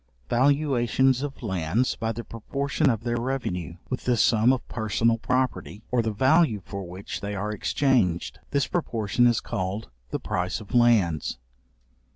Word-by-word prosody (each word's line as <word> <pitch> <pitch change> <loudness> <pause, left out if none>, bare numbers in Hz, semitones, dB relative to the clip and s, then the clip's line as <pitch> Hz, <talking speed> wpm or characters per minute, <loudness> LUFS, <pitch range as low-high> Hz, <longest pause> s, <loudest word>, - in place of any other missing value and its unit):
Valuations 130 -1 +3
of 140 -2 -5
lands 95 +4 0
by 115 -1 -2
the 115 +1 -5
proportion 140 +6 -1
of 115 -2 -1
their 120 0 -1
revenue, 95 -10 -3
with 130 - -4
the 125 -1 +2
sum 115 +2 +4
of 130 -2 -2
personal 115 +1 0
property, 125 -4 -1
or 125 -1 +3
the 110 - -1
value 130 +1 +3
for 100 -2 -6
which 95 +3 -6
they 100 0 -4
are 105 +2 -2
exchanged: 105 - +1
this 140 -1 +1
proportion 120 - +1
is 120 -2 +3
called 95 - -4 0.2
the - - -2
price 90 +3 -2
of 110 +2 -12
lands. 110 - +3
115 Hz, 155 wpm, -26 LUFS, 100-130 Hz, 0.2 s, sum